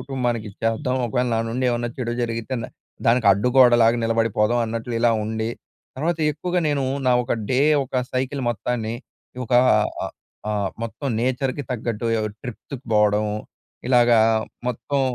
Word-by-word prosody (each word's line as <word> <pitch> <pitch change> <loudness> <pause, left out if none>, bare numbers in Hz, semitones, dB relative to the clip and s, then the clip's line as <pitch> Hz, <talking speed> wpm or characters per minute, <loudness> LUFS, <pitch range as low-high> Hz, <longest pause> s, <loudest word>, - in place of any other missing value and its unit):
కుటుంబానికిది 120 -6 -3
చేద్దాం. 125 +4 0
ఒకవేళ 125 +2 0
నా - - +1
నుండి 125 +3 -2
ఏవన్నా 120 0 -1
చెడు 120 -2 -2
జరిగితే, 115 +2 -3
న - - -5 0.4
దానికడ్డుగోడలాగా 120 +1 +5
నిలబడిపోదాం 115 0 +1
అన్నట్లు, 115 +2 -4
ఇలా 120 0 +4
ఉండి 110 +1 -2 0.5
తర్వాత, 165 +5 -1
ఎక్కువగా 180 +4 -1
నేను, 140 -2 0 0.2
నా 125 - +5
ఒక 120 - -2 0.2
డే, 130 0 +2 0.2
ఒక 130 - -5 0.2
సైకిల్ 130 +2 -1
మొత్తాన్ని, 115 -1 -3 0.4
ఇ - - -7
ఒక 125 - -6 0.5
అ - - -1 0.4
ఆహ్, 100 -2 -1
మొత్తం 115 +5 -5
నేచర్‍కి 130 +3 -1
తగ్గట్టు, 115 -2 -2
ఎ - - 0
ఒ - - -2
ట్రిప్ 125 -4 -7
తిప్ 135 -1 -7
బోవడం, 105 0 +3 0.6
ఇలాగా 120 -2 +5 0.5
మొత్తం 140 +3 -2
120 Hz, 145 wpm, -22 LUFS, 115-130 Hz, 0.6 s, దానికడ్డుగోడలాగా